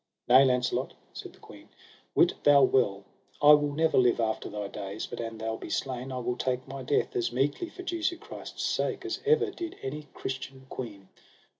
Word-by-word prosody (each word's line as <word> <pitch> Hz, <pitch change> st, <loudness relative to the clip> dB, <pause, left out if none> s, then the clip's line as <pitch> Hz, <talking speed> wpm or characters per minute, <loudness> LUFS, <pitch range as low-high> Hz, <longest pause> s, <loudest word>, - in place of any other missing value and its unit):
Nay, 130 Hz, +2 st, +8 dB
Launcelot, 125 Hz, -2 st, +1 dB, 0.2 s
said -, -, -8 dB
the -, -, -21 dB
queen, -, -, -14 dB, 0.5 s
wit -, -, +5 dB
thou 145 Hz, -1 st, +7 dB
well 100 Hz, -7 st, +2 dB, 0.4 s
I 145 Hz, 0 st, +8 dB
will 145 Hz, -1 st, +5 dB
never 160 Hz, 0 st, +3 dB
live 125 Hz, -2 st, +3 dB
after 110 Hz, -1 st, -1 dB
thy 105 Hz, -1 st, -4 dB
days, 100 Hz, +1 st, -5 dB
but -, -, -8 dB
an 115 Hz, -1 st, -5 dB
thou 110 Hz, 0 st, -3 dB
be -, -, -8 dB
slain 130 Hz, 0 st, -3 dB
I 130 Hz, -, -4 dB
will 125 Hz, 0 st, -2 dB
take 130 Hz, 0 st, -2 dB
my 135 Hz, 0 st, -6 dB
death 135 Hz, +3 st, 0 dB
as 120 Hz, -, 0 dB
meekly 140 Hz, -, 0 dB
for 370 Hz, -, -10 dB
Jesu 345 Hz, -1 st, -1 dB
Christ's -, -, -8 dB
sake 395 Hz, -5 st, -1 dB
as 360 Hz, -2 st, -3 dB
ever 440 Hz, -2 st, +4 dB
did 345 Hz, -3 st, -6 dB
any 150 Hz, +3 st, -5 dB
Christian 130 Hz, 0 st, -6 dB
queen. 100 Hz, -6 st, -7 dB
130 Hz, 190 wpm, -29 LUFS, 120-150 Hz, 0.5 s, Nay